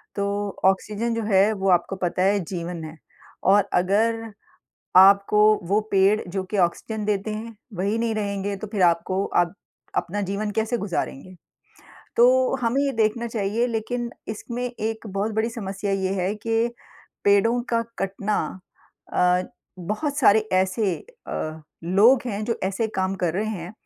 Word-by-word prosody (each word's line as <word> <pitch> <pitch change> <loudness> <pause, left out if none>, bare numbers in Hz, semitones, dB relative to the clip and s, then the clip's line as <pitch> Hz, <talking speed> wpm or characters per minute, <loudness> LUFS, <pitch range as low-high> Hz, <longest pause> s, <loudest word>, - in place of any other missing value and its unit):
तो 200 0 -1 0.2
ऑक्सीजन 210 +4 +1
जो 230 - -2
है, 200 0 +4
वो 195 -1 -1
आपको 180 +2 +2
पता 180 0 -1
है, 200 +1 +3
जीवन 170 -1 -5
है 155 +1 -9 0.5
और 200 +1 +4
अगर 220 +5 +2 0.7
आपको 200 +2 +7 0.2
वो 205 +3 +3
पेड़, 195 +2 +4
जो 190 +1 -2
कि 205 +3 -4
ऑक्सीजन 210 +4 0
देते 205 0 -1
हैं, 230 +1 -7 0.2
वही 200 +5 -1
नहीं 230 -1 0
रहेंगे, 200 -1 -2
तो 215 - -7
फिर 205 -2 -1
आपको 180 +3 +2
आप 175 0 +1 0.4
अपना 200 +4 -1
जीवन 200 +2 -2
कैसे 220 +3 0
गुज़ारेंगे? 185 -2 -4 0.8
तो 255 +2 +4
हमें 240 +4 +1
ये 280 -1 +1
देखना 225 +1 +1
चाहिए, 225 +2 -1
लेकिन 235 +1 -3 0.2
इसमें 235 +3 -5
एक 225 -2 -4
बहुत 200 +2 -2
बड़ी 220 +2 0
समस्या 200 -3 -4
ये 190 0 0
है 190 +3 0
कि 225 +2 0 0.6
पेड़ों 215 +4 +4
का 230 - +3 0.2
कटना 195 +2 -1 0.8
अ, 180 0 +3 0.4
बहुत 215 - -3
सारे 210 +2 +6
ऐसे 190 +1 +1 0.3
अ, 155 0 -4 0.2
लोग 210 +9 +5
हैं, 210 -2 -3
जो 230 0 -2
ऐसे 195 +4 0
काम 190 +1 0
कर 165 - +1
रहे 210 +4 -1
हैं, 185 -3 -5
205 Hz, 155 wpm, -24 LUFS, 190-225 Hz, 0.8 s, आपको